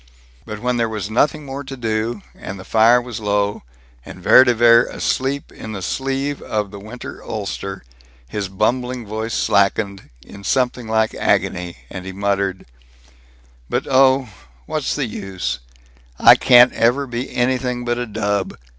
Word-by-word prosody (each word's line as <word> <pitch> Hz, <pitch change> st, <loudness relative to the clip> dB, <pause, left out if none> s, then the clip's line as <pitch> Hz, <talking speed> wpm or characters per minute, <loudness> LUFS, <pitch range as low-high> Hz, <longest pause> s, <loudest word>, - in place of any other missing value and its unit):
But 105 Hz, -, -5 dB
when 125 Hz, +3 st, -1 dB
there 115 Hz, -1 st, +1 dB
was 105 Hz, -2 st, -4 dB
nothing 145 Hz, +5 st, +1 dB
more 140 Hz, +1 st, -6 dB
to 135 Hz, 0 st, -8 dB
do, 110 Hz, -1 st, -2 dB
and 100 Hz, 0 st, -8 dB
the 95 Hz, -, -10 dB
fire 115 Hz, +2 st, +5 dB
was 120 Hz, -2 st, -6 dB
low, 105 Hz, -1 st, 0 dB, 0.4 s
and -, -, -10 dB
Vere 130 Hz, -, +7 dB
de 125 Hz, -2 st, +2 dB
Vere 115 Hz, +1 st, +6 dB
asleep 135 Hz, +2 st, -2 dB
in 110 Hz, -, -8 dB
the 95 Hz, -3 st, -6 dB
sleeve 135 Hz, +4 st, -2 dB
of 105 Hz, -2 st, -3 dB
the 100 Hz, -, -9 dB
winter 110 Hz, +5 st, -9 dB
ulster, 100 Hz, -, -5 dB, 0.4 s
his 100 Hz, -, -3 dB
bumbling 125 Hz, +5 st, -1 dB
voice 110 Hz, +2 st, -4 dB
slackened; 100 Hz, 0 st, +1 dB, 0.2 s
in 100 Hz, -, -12 dB
something 125 Hz, 0 st, 0 dB
like 110 Hz, 0 st, +1 dB
agony 90 Hz, -1 st, 0 dB
he 95 Hz, 0 st, -7 dB
muttered: 100 Hz, -1 st, -1 dB, 1.0 s
"But -, -, -1 dB
oh, 130 Hz, -1 st, +4 dB, 0.4 s
what's 155 Hz, -3 st, -2 dB
the 145 Hz, -, -1 dB
use? 95 Hz, -, -4 dB, 0.6 s
I -, -, +8 dB
can't 125 Hz, 0 st, +6 dB
ever 125 Hz, +5 st, +2 dB
be 125 Hz, 0 st, -5 dB
anything 125 Hz, 0 st, 0 dB
but 120 Hz, 0 st, -1 dB
a 120 Hz, -, -3 dB
dub! 105 Hz, -2 st, -2 dB
115 Hz, 155 wpm, -20 LUFS, 100-125 Hz, 1.0 s, I